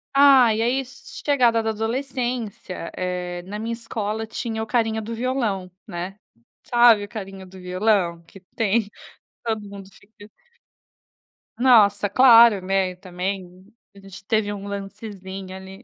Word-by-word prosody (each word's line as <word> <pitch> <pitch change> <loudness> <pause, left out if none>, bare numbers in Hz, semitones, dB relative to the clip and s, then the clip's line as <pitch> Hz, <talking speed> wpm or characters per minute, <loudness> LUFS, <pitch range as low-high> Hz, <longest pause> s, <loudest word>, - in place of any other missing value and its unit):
Ah, 270 -5 +7
e 220 - -1
aí, 260 +3 0
chegada 245 -2 0
da 220 - 0
adolescência, 235 -5 -4
eh, 180 -1 -4
na 205 +2 -5
minha 225 +2 -3
escola 220 -1 -4
tinha 220 0 -4
o 220 - -4
carinha 225 -2 0
do 225 +2 -6
violão, 225 -7 -2 0.2
né, 180 +4 -6 0.5
sabe, 235 -3 +5
o 205 - -8
carinha 195 -3 -8
do 190 +1 -14
violão 180 -2 0
que 195 - -14 0.2
tem, 220 -1 +1 0.5
todo 220 -2 -1
mundo 195 -1 -10
fica 205 +1 -17 1.3
Nossa! 210 -5 +5
Claro, 230 -4 +7
né. 190 -1 0
Também, 185 0 -6 0.3
a - - -14
gente 195 -1 -13
teve 215 -1 0
um 200 0 -7
lancezinho 195 -2 -7
ali. 190 +3 -11
205 Hz, 135 wpm, -23 LUFS, 190-230 Hz, 1.3 s, Ah